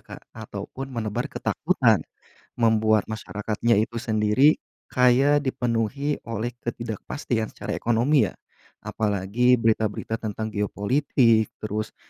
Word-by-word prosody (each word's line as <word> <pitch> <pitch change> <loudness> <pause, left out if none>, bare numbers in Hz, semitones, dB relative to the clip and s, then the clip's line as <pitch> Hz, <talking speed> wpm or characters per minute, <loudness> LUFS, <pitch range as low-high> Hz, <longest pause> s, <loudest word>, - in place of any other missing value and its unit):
Kak, - - -12
atau 105 -3 -7
pun 135 +1 -6
menebar 115 -2 -3
ketakutan, - - +1 0.6
membuat 110 -2 +3
masyarakatnya 110 +1 -1
itu 115 +2 -2
sendiri 110 +5 +3 0.3
kayak 130 +4 +4
dipenuhi 125 +4 -1
oleh 115 +1 -3
ketidakpastian 115 0 -3
secara - - -5
ekonomi 120 +5 +2
ya. - - -10 0.5
Apalagi 105 +4 +1
berita-berita 110 -1 0
tentang 110 0 -4
geopolitik, 110 +2 +1
terus 110 0 -3
115 Hz, 105 wpm, -24 LUFS, 110-125 Hz, 0.6 s, kayak